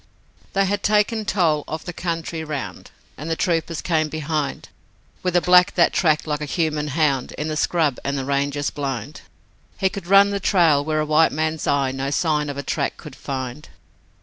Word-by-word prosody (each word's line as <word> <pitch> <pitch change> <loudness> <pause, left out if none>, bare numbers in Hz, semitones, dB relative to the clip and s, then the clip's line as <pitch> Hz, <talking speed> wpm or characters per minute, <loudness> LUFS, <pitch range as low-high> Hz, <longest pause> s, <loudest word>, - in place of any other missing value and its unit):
They 195 0 +2
had 200 +1 -1
taken 210 +1 +1
toll 165 -7 +1
of 155 +1 -5
the 175 - -5
country 165 -1 -3
round, 150 -4 -6 0.3
And 155 +3 -5
the 165 - 0
troopers 165 -2 -1
came 155 -3 +1
behind 155 -1 -3 0.5
With 180 -1 -1
a 175 - +5
black 180 0 +5
that 170 - +4
tracked 155 -4 +2
like 150 -1 -2
a - - -2
human 150 -1 -1
hound 145 -3 0
In 150 +1 -4
the 155 - -2
scrub 155 -4 +1
and 140 0 -2
the 135 - -3
ranges 140 +1 -1
blind: 140 0 -5 0.6
He 190 -2 +2
could 190 -2 -8
run 200 +1 +6
the 200 - -1
trail 165 -7 +3
where 155 0 0
a - - -1
white 155 +1 +4
man's 155 +1 -2
eye 140 -2 +2
No 135 +1 -3
sign 150 0 0
of 140 - -5
a 140 - -4
track 140 -1 -2
could 150 -5 -11
find. 135 +1 -6
155 Hz, 195 wpm, -22 LUFS, 145-175 Hz, 0.6 s, run